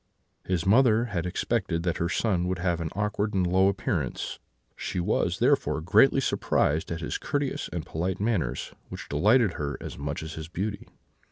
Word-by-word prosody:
"His 90 Hz, -2 st, -1 dB
mother 115 Hz, +2 st, +5 dB
had 85 Hz, -1 st, -1 dB
expected 90 Hz, -3 st, -1 dB
that 85 Hz, -2 st, 0 dB
her 85 Hz, -, -1 dB
son 90 Hz, 0 st, +1 dB
would 90 Hz, 0 st, -1 dB
have 90 Hz, -1 st, 0 dB
had 85 Hz, -, -3 dB
an -, -, -7 dB
awkward 105 Hz, 0 st, -1 dB
and 95 Hz, -1 st, +2 dB
low 95 Hz, +2 st, +4 dB
appearance; 100 Hz, 0 st, -2 dB, 0.4 s
she -, -, -3 dB
was, 85 Hz, -, 0 dB
therefore, -, -, +2 dB
greatly 105 Hz, -, +5 dB
surprised 80 Hz, -, +1 dB
at 80 Hz, 0 st, -3 dB
his -, -, -3 dB
courteous 145 Hz, -2 st, -2 dB
and 85 Hz, -3 st, -4 dB
polite 90 Hz, +3 st, -2 dB
manners, 95 Hz, -, -1 dB, 0.2 s
which -, -, -8 dB
delighted 105 Hz, -, +4 dB
her 70 Hz, -1 st, -3 dB
as -, -, -8 dB
much 70 Hz, +2 st, -3 dB
as 80 Hz, -, -6 dB
his 80 Hz, -1 st, -6 dB
beauty. 100 Hz, +5 st, -4 dB
90 Hz, 180 wpm, -27 LUFS, 85-105 Hz, 0.4 s, mother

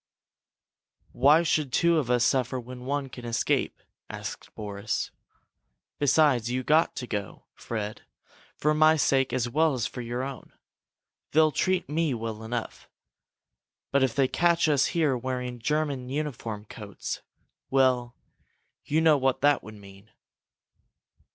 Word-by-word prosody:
"Why 145 Hz, +6 st, +5 dB
should 155 Hz, -4 st, 0 dB
two 170 Hz, +4 st, +3 dB
of 130 Hz, -6 st, -3 dB
us 125 Hz, -1 st, +3 dB
suffer 130 Hz, -1 st, +1 dB
when 125 Hz, +1 st, -9 dB
one 140 Hz, 0 st, -1 dB
can 125 Hz, -1 st, -10 dB
escape?" 120 Hz, 0 st, -1 dB, 0.3 s
asked -, -, -7 dB
Boris. 105 Hz, 0 st, -3 dB, 0.9 s
"Besides, 140 Hz, -4 st, +3 dB
you've 130 Hz, +1 st, -2 dB
got 155 Hz, +2 st, +3 dB
to 125 Hz, -, -4 dB
go, 105 Hz, -4 st, -5 dB
Fred, 105 Hz, -2 st, -5 dB, 0.6 s
for 150 Hz, +1 st, +2 dB
my 155 Hz, +1 st, +5 dB
sake 135 Hz, -3 st, +2 dB
as 125 Hz, -2 st, 0 dB
well 155 Hz, +3 st, +2 dB
as 120 Hz, -, -1 dB
for 125 Hz, -, -5 dB
your 120 Hz, +2 st, -3 dB
own. 135 Hz, 0 st, -8 dB, 0.8 s
They'll 155 Hz, 0 st, +5 dB
treat 185 Hz, +5 st, 0 dB
me 155 Hz, -2 st, 0 dB
well 110 Hz, -1 st, -5 dB
enough. 115 Hz, +1 st, -5 dB, 1.0 s
But 140 Hz, -, +3 dB
if 130 Hz, -3 st, +1 dB
they 135 Hz, -2 st, +3 dB
catch 170 Hz, +3 st, +2 dB
us 145 Hz, -3 st, +3 dB
here 155 Hz, -6 st, +1 dB
wearing 125 Hz, 0 st, -4 dB
German 140 Hz, -1 st, -1 dB
uniform 125 Hz, -7 st, -4 dB
coats 105 Hz, -2 st, -7 dB, 0.5 s
well, 125 Hz, -2 st, +2 dB, 0.7 s
you 155 Hz, +2 st, +1 dB
know 160 Hz, -2 st, +5 dB
what 130 Hz, -1 st, +1 dB
that 145 Hz, +1 st, +4 dB
would 110 Hz, -, -11 dB
mean!" 100 Hz, +1 st, -15 dB
130 Hz, 140 wpm, -27 LUFS, 120-150 Hz, 1.0 s, Why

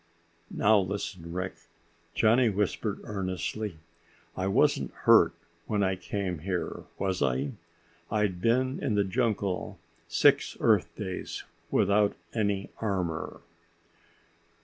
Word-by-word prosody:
"Now, 105 Hz, 0 st, +4 dB
listen, 95 Hz, -3 st, -4 dB
Rick," 95 Hz, +1 st, -3 dB, 0.6 s
Johnny 115 Hz, +2 st, +4 dB
whispered 105 Hz, +1 st, -1 dB
earnestly, 100 Hz, -1 st, -3 dB, 0.6 s
"I 95 Hz, 0 st, -1 dB
wasn't 95 Hz, -, +2 dB
hurt -, -, +7 dB, 0.4 s
when 105 Hz, -2 st, +1 dB
I 95 Hz, 0 st, +1 dB
came 90 Hz, 0 st, -3 dB
here, 90 Hz, +2 st, -3 dB
was 95 Hz, -2 st, -1 dB
I? 65 Hz, +2 st, +1 dB, 0.6 s
I'd 105 Hz, -5 st, 0 dB
been 130 Hz, +4 st, +2 dB
in 110 Hz, -, +1 dB
the 100 Hz, -, +3 dB
jungle 100 Hz, -3 st, -1 dB, 0.3 s
six -, -, +3 dB
Earth -, -, +3 dB
days 95 Hz, -1 st, -5 dB, 0.3 s
without 100 Hz, 0 st, +3 dB, 0.2 s
any 100 Hz, -3 st, -1 dB
armor." 90 Hz, -7 st, -2 dB
100 Hz, 105 wpm, -29 LUFS, 90-105 Hz, 0.6 s, hurt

